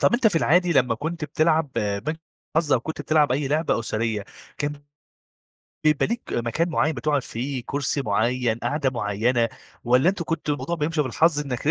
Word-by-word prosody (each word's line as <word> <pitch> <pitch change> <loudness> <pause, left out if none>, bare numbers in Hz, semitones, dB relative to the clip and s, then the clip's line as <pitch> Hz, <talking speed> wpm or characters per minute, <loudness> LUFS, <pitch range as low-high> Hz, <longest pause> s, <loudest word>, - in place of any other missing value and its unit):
طَب - - +4
أنت 240 -2 +3
في 200 - +3
العادي 175 +2 +3
لمّا 125 -6 +3
كنت 160 +6 -4
بتلعب 155 -1 +1
آآ، 100 -1 0
بنك 155 +7 -4 0.4
الحظ، 160 -3 +2
أو 125 - +4
كنت 160 +6 -5
بتلعب 150 -4 +3
أي 135 0 0
لعبة 155 -1 +1
أسرية، 110 -2 -2 0.3
كان 145 0 -1 1.1
بيبقي 150 -2 +3
ليك 235 0 -3
مكان 120 +9 0
معيّن 160 -1 +1
بتقعُد 140 +2 0
فيه، 125 +2 -4
كُرسي 140 0 -1
معيّن 115 +2 0
قعدة 135 +3 0
معيّنة، 115 +1 +1 0.4
والَّا 125 +6 +4
أنتم 185 -3 -1
كنتوا 150 -2 -1
الموضوع 170 +3 -3
بيمشي 155 0 0
بالحظ 150 +4 +2
إنّك 140 0 -3
145 Hz, 175 wpm, -24 LUFS, 120-160 Hz, 1.1 s, طَب